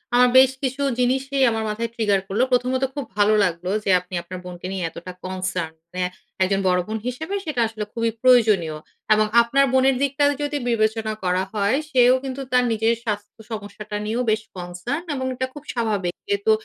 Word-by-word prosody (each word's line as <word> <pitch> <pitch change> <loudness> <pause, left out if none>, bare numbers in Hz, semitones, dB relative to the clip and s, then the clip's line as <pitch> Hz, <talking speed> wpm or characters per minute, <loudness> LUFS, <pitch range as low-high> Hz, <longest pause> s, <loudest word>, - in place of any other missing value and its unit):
আ - - +5 0.2
বেশ 260 0 +7
কিছু 265 +1 -1 0.2
জিনিসই 265 +2 +1
আমার 225 0 -1
মাথায় 230 +2 -2
ট্রিগার 210 -4 +2
করল। 200 +5 0
প্রথমত 255 +1 +1
খুব 285 -3 -3
ভালো 205 +1 +4
লাগলো 180 -1 -1
যে - - -2
আপনি 180 +1 -15
আপনার 180 +1 -8
বোনকে 180 0 -7
নিয়ে 190 -2 -3
এতটা 170 +3 -9
কনসার্ন। 185 -3 -3 0.2
মানে 180 0 -1 0.4
একজন 195 +1 +1
বড় 180 0 +3
বোন 220 +1 -2
হিসেবে 320 +10 -3
সেটা 300 -7 -1
আসলে 220 -1 -5
খুবই 230 -1 0
প্রয়োজনীয় 215 -11 +4 0.4
এবং 215 0 +3 0.2
আপনার 275 +4 +3
বোনের 265 0 +4
দিকটাও 285 +1 +2
যদি 290 0 -1
বিবেচনা 220 -1 +1
করা 180 0 +1
হয়, 205 +3 +2 0.2
সেও 250 -2 +6
কিন্তু 270 0 -4
তার 250 0 +4
নিজের 225 +1 +2
স্বাস্থ্য 210 -1 -4
সমস্যাটা 210 0 -6
নিয়েও 230 +4 -1
বেশ 215 - +1
কনসার্ন 180 - -4
এবং 260 -1 -3
এটা 260 +1 -2
খুব 295 - -10
স্বাভাবিক। 210 -7 -1
যেহেতু 405 +2 +1
225 Hz, 180 wpm, -22 LUFS, 195-255 Hz, 0.4 s, বেশ